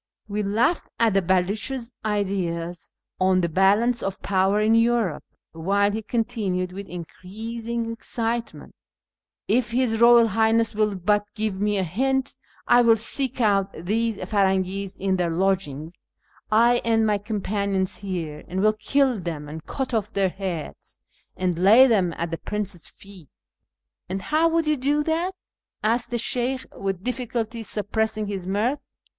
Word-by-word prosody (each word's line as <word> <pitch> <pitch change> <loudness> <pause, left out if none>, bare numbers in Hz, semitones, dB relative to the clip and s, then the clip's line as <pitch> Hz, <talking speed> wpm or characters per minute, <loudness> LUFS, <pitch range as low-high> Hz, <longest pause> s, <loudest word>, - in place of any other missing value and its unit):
We 210 0 -2
laughed 225 - +1
at 230 -3 +3
the 195 - +3
Bcluch's 210 +8 -1
ideas 185 -5 -2 0.3
on 185 0 +3
tlic 170 -2 -1
balance 205 +6 +3
of 195 0 -3
power 195 +1 +2
in 215 +1 +3
Europe, 230 -7 +2 0.3
while 200 +5 +1
he 220 +2 -3
continued 210 -5 -2
with 195 +2 -7
increasing 225 +7 -5
excitement 230 0 -4 0.3
— - - -69
" - - -69
If 240 - -12
his 240 -1 +1
Eoyal 235 0 +6
Highness 225 +2 +2
will 210 -2 0
hut 205 0 +3
give 210 -3 -2
me 210 0 +1
a 190 - +1
hint, 265 - -1 0.3
I 245 - +6
will 230 -1 +6
seek 255 +4 -2
out 200 -3 +2
these 215 +6 -1
Firangis 190 0 0
in 190 0 0
their 175 -2 0
lodging 165 -4 -1 0.3
— - - -34
1 235 +3 +5
and 225 -2 +1
my 210 -1 +1
com 210 +1 -3
panions 195 -2 -1
here 170 -6 -5
— - - -26
and 185 +2 -3
will 215 +1 +4
kill 260 +2 +1
them, 160 -4 -5
and 155 +1 -8
cut 265 -2 -3
off 220 -1 -1
their 195 -2 +1
lieads, 175 -6 -6 0.4
and 180 -2 -1
lay 215 +8 +7
them 200 -9 +2
at 170 0 -3
the 165 - -3
prince's 205 -5 -5
feet." 195 -7 -15 0.4
" - - -51
And 190 +1 -3
how 320 +2 +2
Avould 330 0 +1
you 305 -1 +1
do 290 +3 +1
that? 335 +4 -1 0.3
" - - -50
asked 230 +3 +1
the 240 - -1
Sheykh, 255 +3 -1
with 195 -2 -3
difficulty 235 -2 -3
suppressing 215 0 -1
his 195 -3 -5
mirth. 220 +9 0
210 Hz, 165 wpm, -24 LUFS, 190-230 Hz, 0.4 s, lay